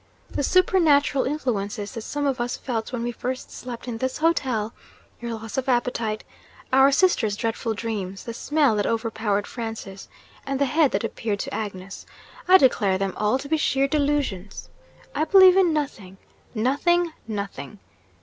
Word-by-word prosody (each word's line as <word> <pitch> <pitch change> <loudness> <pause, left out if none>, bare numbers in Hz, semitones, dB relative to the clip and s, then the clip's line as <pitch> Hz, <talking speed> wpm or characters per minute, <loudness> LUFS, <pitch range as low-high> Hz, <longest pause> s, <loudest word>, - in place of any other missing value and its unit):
The - - -2
supernatural 295 -5 +3
influences 210 -8 -2
that 225 - -6
some 290 +6 -3
of 270 -3 0
us 245 +1 -2
felt 230 -3 -4
when 240 -2 -3
we 240 - -1
first 255 +2 -5
slept 245 -1 -8
in 230 -2 -4
this 260 +1 -2
hotel 260 -9 0 0.5
your 235 -1 -4
loss 225 +3 -4
of 265 - -4
appetite, 235 -3 0 0.5
our 270 +1 +6
sister's 275 - +2
dreadful 225 -1 -2
dreams, 205 -4 -4
the 230 - -6
smell 285 -1 +2
that 205 - 0
overpowered 220 -3 -1
Francis, 225 -5 -7 0.3
and 275 -1 -3
the 280 - +3
head 300 +2 +3
that - - 0
appeared 225 -2 -2
to - - -6
Agnes 195 -3 -6 0.4
I 375 +1 +9
declare 210 - +3
them 195 -1 -2
all 210 +4 +1
to 275 - -8
be 315 +2 +1
sheer 275 -2 +1
delusions! 280 - -2 0.4
I 300 - 0
believe 375 +2 +7
in 375 -3 +4
nothing, 230 -11 -4 0.4
nothing, 320 +9 +1
nothing!' 200 -5 -5
240 Hz, 160 wpm, -24 LUFS, 215-285 Hz, 0.5 s, I